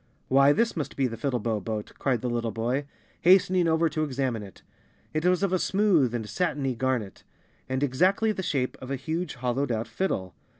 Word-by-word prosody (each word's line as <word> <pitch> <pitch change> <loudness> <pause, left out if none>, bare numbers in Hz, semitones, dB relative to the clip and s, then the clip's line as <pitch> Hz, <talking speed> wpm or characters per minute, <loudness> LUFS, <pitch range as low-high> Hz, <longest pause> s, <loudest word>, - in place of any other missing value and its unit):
" - - -41
Why, 140 +2 +6
this 230 +8 +1
must 155 -4 -4
be 135 - +2
the 115 -2 -2
Fiddlebow 115 -3 -1
Boat," 110 -1 -4
cried 125 -5 0
the 125 - -2
little 120 -1 -1
boy, 120 +6 -2 0.3
hastening 185 -1 +5
over 160 +1 +3
to 155 +1 -1
examine 130 -5 -1
it. 100 -3 -12 0.5
It 155 +2 -1
was 180 +1 +3
of 195 -2 +1
a 185 - +2
smooth 175 - +2
and 110 -3 -3
satiny 140 - -1
garnet, 125 -4 -2 0.5
and 130 +2 -1
exactly 185 - +2
the 200 - -3
shape 135 -8 -1
of 130 - -8
a 135 - -1
huge, 160 +5 -3
hollowed 125 +2 -1
out 115 0 -2
fiddle. 95 - -2
135 Hz, 200 wpm, -27 LUFS, 120-170 Hz, 0.5 s, Why